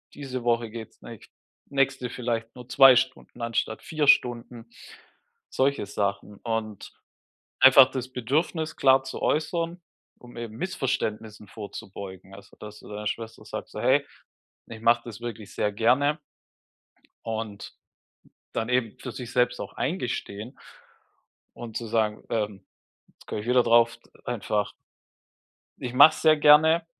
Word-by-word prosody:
diese 130 -3 -6
Woche 120 -1 +1
geht's 115 0 -10
nicht 115 -3 -12 0.4
nächste 135 -2 0
vielleicht 115 -2 -4
nur 125 -1 -11
2 135 -1 +8
Stunden 130 -1 -3
anstatt 115 -1 -2
4 155 -3 -1
Stunden. 120 -2 +2 0.8
Solche 135 -3 +1
Sachen 100 0 -3
und 110 -3 -4 0.7
einfach 130 0 +8
das 130 -1 -4
Bedürfnis 155 +6 -2
klar 135 0 +4
zu 130 - -7
äußern, 170 +2 -1 0.4
um 120 0 -15
eben 115 -2 -7
Missverständnissen 110 - -3
vorzubeugen. 95 -2 -9
Also, 100 0 -16
dass 105 0 -10
du - - -15
deiner 105 0 -7
Schwester 115 +1 -6
sagt, - - -7
so: - - -8
„Hey, - - +3 0.6
ich 110 -1 -10
mache 115 +1 +4
das 120 -1 -9
wirklich 115 -3 -7
sehr 105 - 0
gerne” 135 +8 +2 1.1
und 110 -2 -5 0.8
dann 115 - -2
eben 125 -3 -1
für 125 - -7
sich 120 -1 -8
selbst 125 0 +1
auch - - -7
eingestehen 125 - -4 1.0
und 115 -2 -6
zu 115 - -6
sagen, 110 -1 0
ähm, 105 -4 -3 0.4
jetzt - - -23
komme - - -4
ich 105 - -9
wieder 125 0 +4
drauf, 115 0 +4 0.3
einfach 105 -3 -2 1.1
„ich 125 -3 -5
mach's 140 +5 +7
sehr 155 -1 +5
gerne 160 +3 +6
120 Hz, 135 wpm, -26 LUFS, 110-130 Hz, 1.1 s, 2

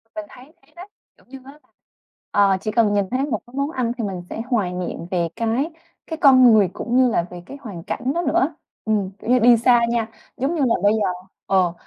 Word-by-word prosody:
Mình 215 - -5
thấy 260 +5 -16
thế 310 - -29
đấy, 360 +3 -10 0.3
kiểu - - -26
như 270 +1 -11
á, 280 +3 -14 0.7
ờ, 200 -2 +3
chỉ 215 - -3
cần 215 -2 +2
nhìn 200 -1 +1
thấy 260 +2 0
một 235 -8 -2
cái 240 - -18
món 280 +2 -1
ăn 250 -6 -1
thì 235 - -3
mình 190 -4 -4
sẽ - - -5
hoài 205 -8 0
niệm 180 -2 -5
về 175 -2 0
cái 235 +7 -1 0.4
cái 320 - -5
con 265 -4 +7
người 205 -4 +4
cũng 240 +2 -2
như 255 -1 +5
là 195 - +1
về 175 -1 -9
cái 275 - -10
hoàn 195 -9 -8
cảnh 255 +8 -3
đó 340 - -1
nữa. 315 -1 0 0.3
Ừm, 210 -4 0
kiểu - - -8
như, 250 0 +4
đi 240 0 +6
xa 240 +1 +4
nha, 235 -2 0 0.3
giống 275 +7 -1
như 315 - -1
là 235 - +2
bây 205 +1 +4
giờ 220 -1 0 0.4
ờ, 185 -3 +2
235 Hz, 240 wpm, -21 LUFS, 205-270 Hz, 0.7 s, con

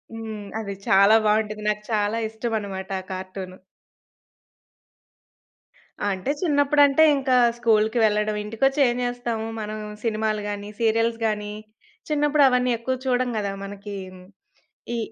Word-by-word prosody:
హ్మ్. 220 -2 -7
అది 200 -2 -5
చాలా 200 +3 +6
బావుంటది. 215 0 0
నాకు 210 0 -2
చాలా 210 +1 +1
ఇష్టమనమాట 215 -4 -4
ఆ - - -16
కార్టూను. 185 0 -7 2.5
అంటే 195 +7 -2
చిన్నప్పుడంటే 285 -2 +4
ఇంకా 260 -2 +2 0.2
స్కూల్కి 220 0 +2
వెళ్ళడం. 210 0 +1
ఇంటికొచ్చి 270 +7 0
ఏం 240 - -1
జేస్తాము? 240 -2 -3
మనం 215 0 -4 0.3
సినిమాలు 215 -1 0
గానీ, 205 0 -5
సీరియల్స్ 230 0 +2
గానీ 210 -1 -2 0.6
చిన్నప్పుడు 295 0 +3
అవన్నీ 250 0 +2
ఎక్కువ 260 +3 -2
చూడము 250 -1 +1
గదా! 200 -2 -2
మనకి 200 +1 -8 1.0
ఈ - - -2
220 Hz, 115 wpm, -24 LUFS, 210-245 Hz, 2.5 s, చాలా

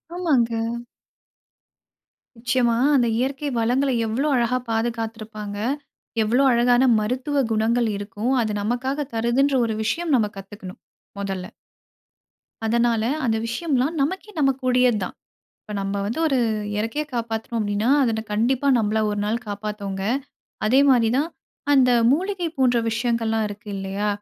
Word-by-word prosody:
ஆமாங்க. 275 -10 +2 1.8
நிச்சயமா. 240 0 +1 0.2
அந்த 245 -3 +3
இயற்கை 270 +3 -1
வளங்கள 250 +5 +1 0.2
எவ்வளோ 240 +7 -1
அழகா 240 0 +1
பாதுகாத்திருப்பாங்க. 225 -2 -3 0.7
எவ்வளோ 245 +6 +2
அழகான 245 +2 +4
மருத்துவ 255 +7 -2
குணங்கள் 225 +2 +2
இருக்கும். 205 +4 -3
அது 215 - -2
நமக்காக 260 +6 -2
தருதுன்ற 240 +5 +2
ஒரு 220 -1 -2
விஷயம் 310 +9 -1
நம்ம 220 -4 +2
கத்துக்கணும். 195 -1 -10 0.4
மொதல்ல. 195 -2 -3 1.2
அதனால, 235 0 +2 0.2
அந்த 225 -2 +1
விஷயம்லாம் 275 +4 0
நமக்கே 380 +8 -2
நமக்குடையது 255 -4 +2
தான். - - -6 0.5
இப்ப 210 - -9
நம்ம 195 +1 -3
வந்து 230 +9 -3
ஒரு 275 -4 +2 0.4
இயற்க்கையை 225 +8 -1
காப்பாத்துனோம் 230 0 -3
அப்படின்னா, 205 +2 0
அது 225 -3 0
கண்டிப்பா 250 +6 +1
நம்பள 220 0 +1
ஒரு 205 - -2
நாள் 230 +3 -1
காப்பாத்துங்க. 200 -2 -4 0.6
அதே 260 +5 +5
மாரி 240 -4 +4
தான் 305 - 0 0.4
அந்த 260 -3 +5 0.2
மூலிகை 360 +1 -1
போன்ற 250 -2 +3
விஷயங்கள்லாம் 225 -1 0
இருக்கு 205 +1 -10
இல்லையா? 195 +2 -2
235 Hz, 120 wpm, -23 LUFS, 215-260 Hz, 1.8 s, அதே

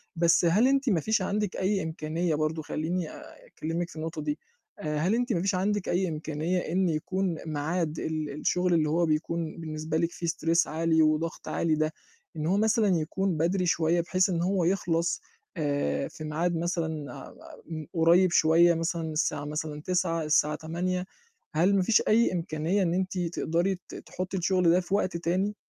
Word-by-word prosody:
بس 170 +1 +4
هل 200 +9 +4
أنتِ 270 0 +2
ما 185 -6 +3
فيش 220 +6 +1
عندِك 200 +1 -1
أي 190 +1 0
إمكانيّة 160 +1 -2
برضه، 155 +1 -1
خلّيني 160 +3 -2 0.4
أكلمِك 165 +2 -4
في - - -13
النقطة 160 +1 -4
دي، 295 0 -2 0.4
آآ، 150 -1 -2
هل 180 +8 +2
أنتِ 245 0 0
ما 170 - 0
فيش 195 +1 +1
عندِك 200 +1 0
أي 185 +2 +1
إمكانيّة 160 +3 -2
إن 180 +1 0
يكون 175 +2 -1
ميعاد 160 +1 -2
ال 155 -1 -3
الشُغل 180 +5 0
اللي 155 -2 +2
هو 170 +3 +2
بيكون 160 +1 -1
بالنسبة 155 -1 -3
لِك 170 +1 0
فيه 170 - -5
stress 165 0 +1
عالي 160 +1 +2
وضغط 155 +2 0
عالي 160 -2 +1
ده، 155 +1 0 0.4
إن 155 - -2
هو 185 +5 +2
مثلًا 220 0 +3
يكون 170 +3 -1
بدري 180 +4 +1
شوية 170 0 +2
بحيث 185 +3 +1
إن 170 -2 0
هو 185 +1 +1
يخلص 170 -2 0 0.4
آآ، 145 - 0
في 155 - -10
ميعاد 165 +3 -1
مثلًا 170 0 -1
أم 155 -3 -5
أ - - -10 0.4
م 155 -1 -5
قريّب 170 +2 +4
شوية 170 +1 +5
مثلًا 165 -1 -2
الساعة 155 -2 -1
مثلًا 150 0 -4
21:00، 170 -1 0
الساعة 150 0 +2
20:00. 180 +3 -2 0.5
هل 180 +6 +4
ما 195 - +3
فيش 215 +4 +4
أي 225 0 +4
إمكانية 170 +3 0
إن 170 -2 +1
أنتِ 185 +1 -1
تقدري 175 +2 0
ت - - -8
تحُطّي 185 +1 -5
الشُغل 180 -1 +2
ده 175 - +4
في 185 +1 -5
وقت 190 -4 +1
تاني؟ 185 +5 0
170 Hz, 180 wpm, -28 LUFS, 155-185 Hz, 0.5 s, شوية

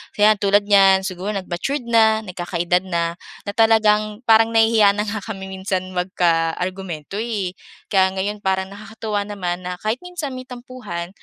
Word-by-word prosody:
Hayan 210 0 +5
tulad 205 +1 +3
niyan, 195 -2 +5
siguro 190 +2 -4
nag-matured 195 +9 -3
na, 220 -2 +3
nagkaka-edad 180 0 -1
na, 170 0 -2 0.2
na 200 - -4
talagang 215 0 +2
parang 225 0 +4
nahihiya 220 -3 +5
na 210 - 0
nga 215 0 -3
kami 190 -2 -7
minsan 190 -1 -2
magka-argumento, 180 0 -1
eh. 210 -6 -2 0.4
Kaya 190 -1 +3
ngayon, 205 +2 -2
parang 190 -1 -1
nakakatuwa 210 0 -4
naman 180 -3 -4
na 180 - -3
kahit 215 +6 -2
minsan 355 -6 -6
may 255 - -8
tampuhan, 240 -9 -7
200 Hz, 150 wpm, -21 LUFS, 185-220 Hz, 0.4 s, Hayan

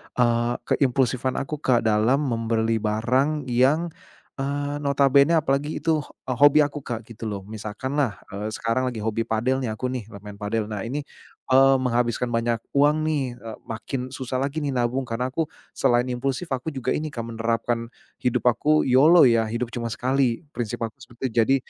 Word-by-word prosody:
eee, 120 0 +2
keimpulsifan 130 -1 +1
aku 145 +1 -3
Kak 120 -5 +2
dalam 110 +6 +2
membeli 115 -2 0
barang 125 +8 +1
yang, 145 +8 +3 0.5
eee, 145 +1 -2
notabenenya 140 +2 +4
apalagi 140 +3 -1
itu 160 -2 +2
ho - - -9
e 130 - -4
hobi 145 +4 +6
aku 145 0 -3
Kak, 120 -4 -5
gitu 115 0 -8
loh. 100 -2 -4
Misalkanlah, 110 +5 -3
eee, 105 +2 -4
sekarang 130 +3 0
lagi 115 -4 -4
hobi 110 +1 -1
padel 125 +4 +1
nih 125 - -2
aku 125 +3 -3
nih 120 -5 -5
le 100 - -9
maen 105 -1 -9
padel. 105 +1 -1
Nah 105 -2 -4
ini, 145 +3 -3 0.5
eee, 135 +1 +6
menghabiskan 120 -1 0
banyak 115 0 +1 0.2
uang 145 +2 +4
nih, 150 -3 +1 0.2
e 115 - -9 0.2
makin 125 +3 -4
susah 130 -1 -5
lagi 145 +3 -2
nih 140 - -1
nabung 125 +2 0
karena 125 +3 -2
aku, 160 +3 0 0.3
selain 120 +1 +3
impulsif 135 +7 -2
aku 130 +3 -3
juga 130 -3 -3
ini 155 +1 -2
Kak 120 - -3
menerapkan 115 +1 -1 0.3
hidup 125 - 0
aku 150 +7 +2
YOLO 145 +7 +6
ya, 115 -1 +3
hidup 115 +1 -3
cuma 115 -1 -3
sekali. 130 0 +1
Prinsip 120 -3 -4
aku 110 - -5
seperti 120 +1 -5
jadi 120 +4 +3
125 Hz, 175 wpm, -24 LUFS, 115-140 Hz, 0.5 s, hobi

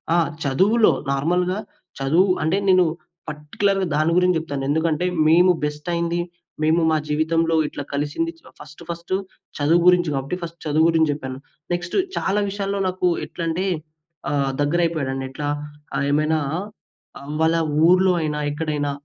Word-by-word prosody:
ఆ! - - +4 0.3
చదువులో. 200 - +4 0.2
నార్మల్‌గా 180 +7 0 0.4
చదువు 165 +8 +3
అంటే 165 +5 +1
నేను 185 -1 +5 0.4
పర్టిక్యులర్‌గా 185 +6 -1
దాని 155 +2 +2
గురించి 180 -1 +3
జెప్తాను. 140 -4 -4
ఎందుకంటే 160 +2 +1 0.2
మేము 175 +3 +6
బెస్టయింది, 170 +3 -2 0.4
మేము 160 +2 +3
మా 155 - +3
జీవితంలో 165 +2 +1
ఇట్ల 145 - -6
కలిసింది 145 - -1 0.3
ఫస్ట్ 150 +2 -13
ఫస్టు 170 +2 -3 0.4
చదువు 160 +4 +3
గురించి 180 -2 +5
గాబట్టి, 135 +6 -2
ఫస్ట్ 170 0 -7
చదువు 155 +2 +3
గురించి 160 -2 +3
జెప్పాను. 130 -3 -5 0.3
నెక్స్ట్ 175 - -3 0.2
చాలా 200 +2 0
విషయాల్లో 200 0 -3
నాకు 185 0 0 0.2
ఎట్లంటే, 170 +2 -3 0.7
ఆహ్, 140 -2 +1
దగ్గరైపోయాడండి 145 -4 0
ఎట్లా? 145 +2 -3 0.5
ఆహ్, - - 0
ఏమైనా 155 +2 +2 0.8
ఆహ్, 140 +1 -8
వాళ్ళ 160 +1 +3 0.3
ఊర్లోయినా 175 -4 +3
ఎక్కడైనా, 150 -1 -2
165 Hz, 130 wpm, -22 LUFS, 150-180 Hz, 0.8 s, మేము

